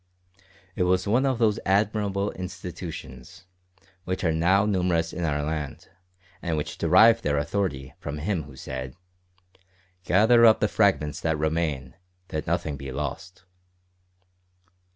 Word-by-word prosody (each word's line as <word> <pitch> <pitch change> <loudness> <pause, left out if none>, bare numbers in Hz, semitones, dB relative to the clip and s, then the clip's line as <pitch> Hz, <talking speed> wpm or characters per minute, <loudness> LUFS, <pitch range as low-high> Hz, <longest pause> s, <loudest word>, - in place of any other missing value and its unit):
It - - -3
was 90 +1 +2
one 125 +6 +2
of 130 -2 0
those 110 -3 +2
admirable 100 0 +1
institutions, 90 -3 -8 0.6
which 95 0 -3
are 85 - +2
now 90 +6 +3
numerous 90 -5 0
in 90 - -4
our 75 -2 0
land, 75 -2 -5 0.5
and 80 -2 -2
which 75 - -4
derive 115 +1 +6
their 75 -6 0
authority 75 -3 -2
from 75 +1 -5
Him 85 0 -2
who 75 -3 -13
said, 65 -1 -6 1.1
"Gather 110 +6 +5
up 110 -2 +7
the 105 - +2
fragments 95 -9 +1
that 80 -1 0
remain, 75 -4 -1 0.4
that 75 - -4
nothing 80 -3 -1
be 70 0 -7
lost." 75 +7 -6
85 Hz, 130 wpm, -25 LUFS, 75-100 Hz, 1.1 s, up